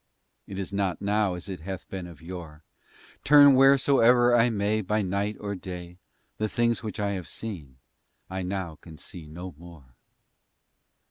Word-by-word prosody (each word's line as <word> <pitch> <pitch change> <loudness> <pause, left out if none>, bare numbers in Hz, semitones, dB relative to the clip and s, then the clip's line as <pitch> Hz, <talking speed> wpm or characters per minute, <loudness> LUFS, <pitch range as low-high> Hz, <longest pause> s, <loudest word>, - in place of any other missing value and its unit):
It 95 - -7
is 95 0 -5
not 100 -3 -1
now 100 -1 +1
as 90 - -8
it 95 -2 -6
hath 95 +3 -7
been 95 -2 -6
of 80 -2 -14
yore;— 85 -3 -9 0.6
Turn 145 -1 +8
wheresoe'er 130 -3 +5
I 120 0 +4
may, 105 0 0
By 105 +2 0
night 100 +3 -2
or 100 -1 -4
day, 90 -2 -8 0.4
The 110 0 0
things 120 +1 +1
which 110 -4 -6
I 100 -1 0
have 95 -4 -4
seen 80 - -8 0.5
I 95 0 -4
now 90 -3 -4
can 80 -2 -12
see 80 -1 -10
no 90 +4 -8
more. 80 -7 -14
95 Hz, 160 wpm, -27 LUFS, 90-110 Hz, 0.6 s, Turn